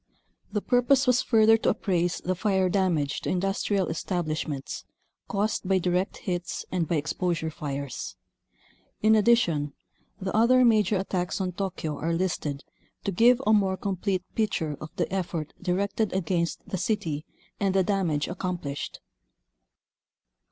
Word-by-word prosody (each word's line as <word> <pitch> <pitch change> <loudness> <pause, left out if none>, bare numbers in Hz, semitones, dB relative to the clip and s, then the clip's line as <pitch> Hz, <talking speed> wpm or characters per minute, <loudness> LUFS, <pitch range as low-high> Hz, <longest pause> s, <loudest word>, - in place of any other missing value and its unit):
The 210 - -1
purpose 255 +2 +3
was 250 -1 +4
further 225 -1 +5
to - - +1
appraise 175 -3 0
the 185 - +1
fire 190 0 +1
damage 175 -7 +1
to - - -3
indus 195 +2 0
trial 195 -4 +1
establishments 155 -4 -3 0.4
caused 205 -1 -1
by 190 - +4
direct 180 +1 0
hits 175 -2 -3
and 175 -3 0
by 170 - 0
exposure 165 +2 -1
fires. 140 -3 -5 0.9
In 215 +1 +6
addition, 180 - +3 0.5
the 190 0 -3
other 250 +3 +5
major 215 -3 +4
attacks 185 -1 -2
on 185 -1 -1
Tokyo 175 -5 -3
are 165 +2 0
listed 155 -5 -2 0.4
to 200 - -1
give 235 +6 +5
a 215 - +5
more 195 -3 +3
com 195 0 -2
plete 185 0 -1
picture 165 -9 0
of 155 - -6
the 175 - +1
effort 170 -5 -3
directed 200 +3 0
against 170 -2 -1
the 190 - -3
city 160 -9 -1 0.4
and 195 -1 +1
the 190 - +4
damage 175 -7 0
accomplished. 175 -5 -4
185 Hz, 145 wpm, -27 LUFS, 165-205 Hz, 0.9 s, In